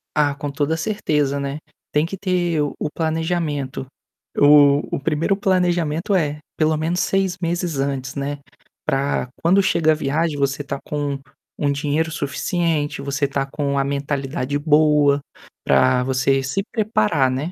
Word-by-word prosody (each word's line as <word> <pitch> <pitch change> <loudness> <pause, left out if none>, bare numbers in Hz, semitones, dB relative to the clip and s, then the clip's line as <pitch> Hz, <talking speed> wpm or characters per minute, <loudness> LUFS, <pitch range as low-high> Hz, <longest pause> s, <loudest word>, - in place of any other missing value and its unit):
Ah, 145 -2 +2
com 145 0 -4
toda 145 +3 0
a - - -5
certeza, 150 -7 0
né. 140 +1 -3 0.3
Tem 150 +1 +2
que 190 +4 -6
ter 175 -4 0
o 145 - -1
o - - -2
planejamento. 160 -4 -2 0.5
O 145 0 +6
o - - -3
primeiro 160 +6 0
planejamento 175 -2 +1
é 150 -4 0 0.4
menos 170 +3 0
6 195 -2 +1
meses 170 -2 -1
antes, 135 -1 -2
né, 140 +1 -3 0.5
pra 135 -1 0
quando 185 +4 +4
chega 170 -4 +2
a - - +3
viagem 155 +1 -1
você 140 0 0
estar 140 -1 -5
com 145 -2 -2 0.4
um 145 - +1
dinheiro 150 +3 0
suficiente, 150 0 -1
você 140 0 -1
estar 140 0 -2
com 140 -2 -1
a 135 - +2
mentalidade 140 -1 -2
boa, 150 -1 +4 0.5
pra 130 -1 +4
você 135 +1 +2
se 135 +10 -2
preparar, 145 - +2
né. 135 +7 -2
145 Hz, 150 wpm, -21 LUFS, 140-165 Hz, 0.5 s, O